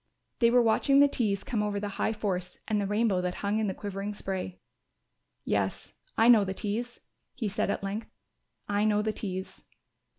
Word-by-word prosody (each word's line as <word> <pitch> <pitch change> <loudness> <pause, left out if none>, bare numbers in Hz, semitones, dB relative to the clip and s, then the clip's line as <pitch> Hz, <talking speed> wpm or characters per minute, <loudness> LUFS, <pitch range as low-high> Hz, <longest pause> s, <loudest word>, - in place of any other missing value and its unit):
They 235 - +5
were 245 0 +5
watching 275 +5 +4
the 285 - +8
Tees 210 -8 0
come 225 -4 -1
over 205 -1 -1
the 205 0 -3
High - - +2
Force 190 -4 -3
and 210 -2 +1
the 200 - -1
rainbow 205 -2 +2
that 180 0 -2
hung 205 +2 +1
in 220 - +1
the 190 - -2
quivering 205 0 -4
spray. 190 -2 -4 0.9
"Yes, - - -1 0.2
I 225 - +5
know 230 -4 +8
the 190 0 -3
Tees," 230 +5 -3 0.4
he 225 - -2
said 200 0 -1
at - - -1
length. 205 +3 -4 0.6
"I 205 0 +1
know 210 -1 +3
the 215 0 0
Tees. 190 -3 -5
210 Hz, 190 wpm, -29 LUFS, 195-220 Hz, 0.9 s, the